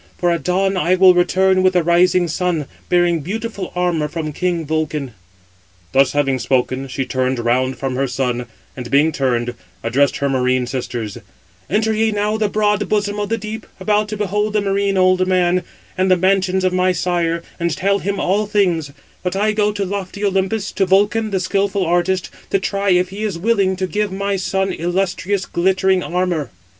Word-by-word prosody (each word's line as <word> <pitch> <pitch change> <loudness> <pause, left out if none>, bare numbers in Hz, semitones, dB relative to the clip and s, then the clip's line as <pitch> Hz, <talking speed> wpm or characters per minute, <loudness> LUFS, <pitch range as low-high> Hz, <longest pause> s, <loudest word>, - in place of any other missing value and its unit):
For 175 -1 +1
at 170 -4 -1
dawn 190 +4 +1
I 180 0 +2
will 185 0 +7
return 185 +1 +3
with 185 0 +3
the 180 -2 +2
rising 175 +1 +3
sun, 165 -2 -1 0.2
bearing 175 -1 +3
beautiful 200 +4 -5
armour 175 -4 0
from 155 -1 -4
king 175 0 -1
Vulcan." 150 -4 -2 0.8
Thus 135 -1 +3
having 135 -3 +1
spoken, 130 +1 0
she 135 +1 -3
turned 130 0 -1
round 125 +2 0
from 135 -2 -3
her 135 +1 +1
son, 125 -1 -2 0.3
and 125 -2 -7
being 145 +5 +3
turned, 120 -4 -1 0.3
addressed 135 +5 +2
her 140 - 0
marine 130 -1 +1
sisters: 120 -4 -4 0.5
"Enter 220 +2 +1
ye 220 0 +1
now 210 +1 0
the 215 -1 0
broad 210 -1 +1
bosom 205 -1 0
of 205 - -2
the 230 - 0
deep, 215 0 -7
about 210 +2 +1
to 215 - -4
behold 210 +1 -1
the 210 - +2
marine 200 0 0
old 185 0 +3
man, 180 -1 +2 0.3
and 185 0 +1
the 185 - +5
mansions 190 0 +1
of 185 0 +1
my 185 0 +2
sire, 170 -1 -1 0.2
and 170 -1 -1
tell 200 +2 +1
him 200 0 -2
all 205 +3 +1
things; 180 -8 +1 0.3
but 180 0 -2
I 210 +2 +2
go 210 -1 +1
to 205 -1 -2
lofty 200 +1 -4
Olympus, 195 +2 0
to 195 -2 0
Vulcan, 210 +3 +2
the 195 -2 -1
skilful 195 +1 0
artist, 175 +1 0 0.2
to - - +2
try 200 +1 -1
if 180 0 +3
he 200 +3 -7
is 210 -5 -2
willing 195 -1 +1
to 185 0 -2
give 210 +1 -2
my 200 +1 -1
son 190 0 -1
illustrious, 185 +2 -1
glittering 190 +1 +1
armour." 175 -6 -1
185 Hz, 185 wpm, -19 LUFS, 160-200 Hz, 0.8 s, will